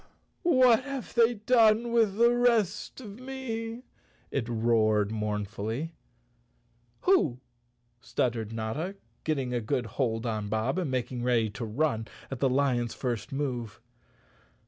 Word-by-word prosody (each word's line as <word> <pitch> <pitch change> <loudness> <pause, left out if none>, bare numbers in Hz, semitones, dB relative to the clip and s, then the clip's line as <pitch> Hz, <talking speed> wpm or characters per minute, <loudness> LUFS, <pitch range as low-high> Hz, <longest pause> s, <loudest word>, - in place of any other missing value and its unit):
" - - -43
What 255 - +5
have 275 -3 -5
they 235 0 +4
done 225 +1 +4
with 225 -4 +3
the 235 +1 +5
rest 230 -2 +1
of 210 -2 -9
me? 245 -3 -5 0.2
" - - -35
it 120 -4 -2
roared 110 -3 +2
mournfully. 105 +6 -3 1.1
"Who?" 160 - +3 0.6
stuttered 115 -2 -1
Notta, 115 - -3 0.3
getting 135 -5 -1
a 120 - 0
good 125 +2 -1
hold 115 0 -1
on 110 -3 -2
Bob 110 - 0
and 175 -6 -1
making 125 -1 -2
ready 120 -3 +2
to 115 +3 -5
run 115 -1 0 0.2
at 135 - -4
the 135 - +3
lion's 125 -3 +1
first 120 -4 -3
move. 125 -6 -3
130 Hz, 135 wpm, -29 LUFS, -, 1.1 s, What